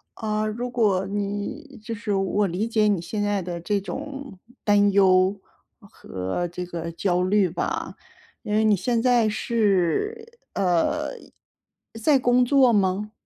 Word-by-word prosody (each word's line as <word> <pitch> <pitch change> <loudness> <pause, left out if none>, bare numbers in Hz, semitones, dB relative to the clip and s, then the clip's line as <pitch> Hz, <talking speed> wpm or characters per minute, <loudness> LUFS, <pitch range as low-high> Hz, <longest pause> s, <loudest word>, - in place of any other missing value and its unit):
呃， 215 -1 -2
如 235 +3 -4
果 210 -6 +1
你 205 +8 -4
就 230 0 -5
是 205 -1 -3
我 195 +1 +1
理 190 +6 -2
解 215 -2 +2
你 195 -5 +1
现 205 +4 -4
在 205 -1 0
的 175 -1 -5
这 200 +4 -1
种 275 -3 -7 0.2
担 205 -1 +4
忧， 190 0 +4 0.4
和 95 - -5
这 180 +1 -6
个 170 -1 -5
焦 180 +1 0
虑 195 -1 +2
吧， 175 - -3 0.5
因 210 - -4
为 215 - +3
你 215 -1 +4
现 230 +5 0
在 240 -3 +3
是， 235 - 0
呃， 180 -4 +1 0.9
在 280 +3 +4
工 245 0 +3
作 265 -2 +4
吗？ 200 +1 0
205 Hz, 155 characters per minute, -24 LUFS, 185-235 Hz, 0.9 s, 担